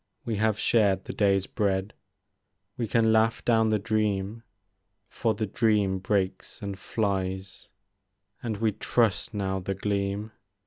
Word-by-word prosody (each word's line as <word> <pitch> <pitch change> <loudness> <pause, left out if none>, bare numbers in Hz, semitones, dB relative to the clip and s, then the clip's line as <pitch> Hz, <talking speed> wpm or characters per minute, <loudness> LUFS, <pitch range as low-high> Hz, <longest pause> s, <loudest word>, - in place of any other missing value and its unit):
We 110 -3 -1
have 110 0 +2
shared 100 -5 +2
the - - -6
day's 100 -2 +2
bread* 100 0 -1 0.8
We 120 -2 -2
can 110 0 +3
laugh 110 +1 +2
down 110 -2 +4
the 110 - +3
dream. 105 0 -1 0.7
For 110 +1 -1
the 110 +1 -1
dream 105 -3 +1
breaks 95 0 -1
and 100 -1 -5
flies; 95 -2 -3 0.7
And 110 -3 -3
we 110 +1 +1
trust 115 +1 0
now 95 -1 -1
the 95 +1 -3
gleam. 100 +1 -2
105 Hz, 135 wpm, -27 LUFS, 95-110 Hz, 0.8 s, down